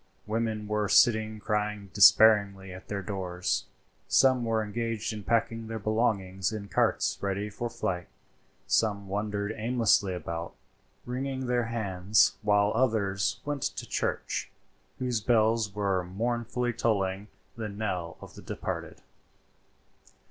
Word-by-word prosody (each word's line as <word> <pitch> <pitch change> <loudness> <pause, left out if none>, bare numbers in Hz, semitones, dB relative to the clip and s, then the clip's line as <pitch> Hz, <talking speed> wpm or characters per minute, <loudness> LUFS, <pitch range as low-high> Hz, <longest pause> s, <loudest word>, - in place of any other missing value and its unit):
Women 110 -1 -2
were 105 -1 0
sitting 110 -2 +4
crying 105 -1 -2
despairingly 100 -2 +6
at 95 - -11
their 100 -1 -4
doors. 90 -2 -2 0.4
Some 130 -2 +4
were 115 -1 +1
engaged 115 +1 -3
in 105 - -6
packing 115 +1 0
their 110 0 -4
belongings 105 -3 0
in 105 -2 -6
carts - - +1
ready 100 +1 -2
for 120 +4 -4
flight. 90 -5 -3 0.6
Some 100 -3 +1
wandered 105 +1 -2
aimlessly 110 -4 +2
about, 85 -1 -5 0.5
wringing 130 +1 -3
their 120 -1 +1
hands, 105 -3 +2
while 105 0 +3
others 110 -6 +1
went 145 -1 -3
to - - -3
the - - -22
church, - - -2 0.5
whose 125 -3 -1
bells 110 -2 +2
were 100 -3 0
mournfully 120 +5 -2
tolling 100 -4 0 0.3
the 110 -2 -4
knell 95 -5 -4
of - - -11
the - - -11
departed. - - -5
105 Hz, 125 wpm, -28 LUFS, 100-115 Hz, 0.6 s, despairingly